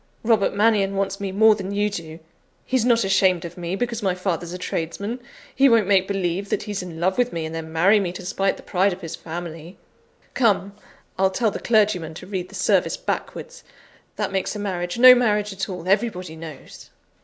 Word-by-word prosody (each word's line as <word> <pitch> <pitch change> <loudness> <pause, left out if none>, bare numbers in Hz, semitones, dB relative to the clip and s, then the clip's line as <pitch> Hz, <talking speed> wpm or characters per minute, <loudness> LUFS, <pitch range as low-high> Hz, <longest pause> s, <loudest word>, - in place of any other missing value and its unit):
Robert 220 -4 +2
Mannion 205 -2 +2
wants 195 0 -2
me 200 -1 -3
more 220 +3 +5
than 195 -2 -5
you 205 +1 +1
do 165 -5 -7 0.5
he's 255 -3 +1
not 235 -2 +3
ashamed 190 -3 +2
of 170 0 -8
me 175 +1 -4
because 235 +1 -3
my 190 -3 0
father's 175 -2 -3
a 180 - -5
tradesman; 200 +7 -4 0.4
he 275 +1 +5
won't 230 -3 +4
make 190 -1 +3
believe 195 0 -2
that - - -1
he's 205 -2 -4
in 170 -3 -8
love 190 +5 0
with 245 0 +2
me, 165 -1 -3
and 160 - -6
then 160 -1 -6
marry 190 +6 +4
me 185 -3 -2
to 180 0 -8
spite 195 +1 0
the - - -13
pride 190 +1 +1
of 185 - -10
his 165 -1 -6
family. 165 +1 -8 0.6
Come! 200 -5 +1 0.5
I'll 190 0 +4
tell 215 +3 0
the - - -5
clergyman 205 -8 +1
to 180 - -9
read 185 -2 -4
the - - -11
service - - +1
backwards; - - -5 0.5
that - - -2
makes 190 +2 -2
a - - -5
marriage 180 -2 -3
no 255 +1 +10
marriage 210 -4 +1
at 195 +1 -4
all, 180 -2 -6
everybody 185 -5 0
knows." 160 -3 -11
195 Hz, 205 wpm, -23 LUFS, 175-210 Hz, 0.6 s, no